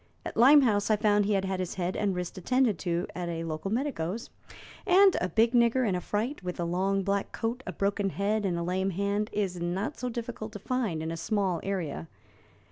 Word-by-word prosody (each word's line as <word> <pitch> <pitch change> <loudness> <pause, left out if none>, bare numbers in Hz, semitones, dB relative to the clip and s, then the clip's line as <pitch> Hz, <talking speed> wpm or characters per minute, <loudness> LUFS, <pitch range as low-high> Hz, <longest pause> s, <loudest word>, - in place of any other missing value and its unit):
At - - -5
Limehouse 240 -4 +5
I 215 - +5
found 205 -1 +2
he 210 - +1
had 195 -1 +1
had 190 -1 -2
his 185 -2 -3
head 180 -1 -2
and 200 -3 0
wrist 180 -1 -4
attended 220 - +1
to 170 +3 -1
at 175 -1 -4
a 165 -1 -3
local 160 +3 -4
medico's, 230 - -2 0.6
and 385 +1 +6
a 180 - 0
big 225 +6 +3
nigger 240 +1 +3
in 195 - +1
a 180 - -1
fright, 220 - -2
with 180 -1 -5
a 170 - 0
long 190 +3 0
black 200 +1 -1
coat, 235 +3 -3
a - - -2
broken 200 0 0
head, 205 +3 -1
and 180 -3 0
a 170 - -2
lame 185 +2 0
hand, 200 +3 -1
is 190 -4 -2
not 180 +5 -2
so 250 - -2
difficult 230 -2 -6
to - - -5
find 210 -7 -2
in 160 - -3
a 165 - -4
small 195 -2 0
area. 180 -6 -3
200 Hz, 215 wpm, -28 LUFS, 180-225 Hz, 0.6 s, and